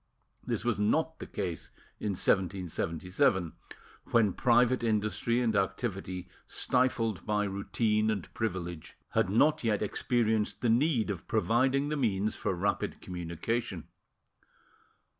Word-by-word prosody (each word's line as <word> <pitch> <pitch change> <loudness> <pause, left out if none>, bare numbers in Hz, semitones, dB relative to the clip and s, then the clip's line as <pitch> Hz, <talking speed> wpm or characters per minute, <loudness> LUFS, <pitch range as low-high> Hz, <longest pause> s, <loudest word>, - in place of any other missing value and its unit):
This - - -3
was 120 -5 +1
not 160 +10 +1
the - - -7
case 85 -4 -4 0.3
in 105 - -1
1777, 90 -2 +1 0.5
when 110 -5 +3
private 120 +2 +3
industry 110 +2 +1
and 115 -3 +1
activity, 95 -2 -2 0.2
stifled 120 -5 0
by 105 -1 0
routine 105 +2 0
and 105 -5 -3
privilege, 90 -7 -4
had - - +1
not 145 +10 +3
yet 110 -2 +1
experienced 110 0 0
the 120 - +2
need 120 -2 +2
of 95 - -7
providing 130 +6 +2
the 150 - -1
means 110 -5 0
for 95 - -2
rapid 100 +3 -1
communication. 90 +3 -4
105 Hz, 120 wpm, -30 LUFS, 95-120 Hz, 0.5 s, when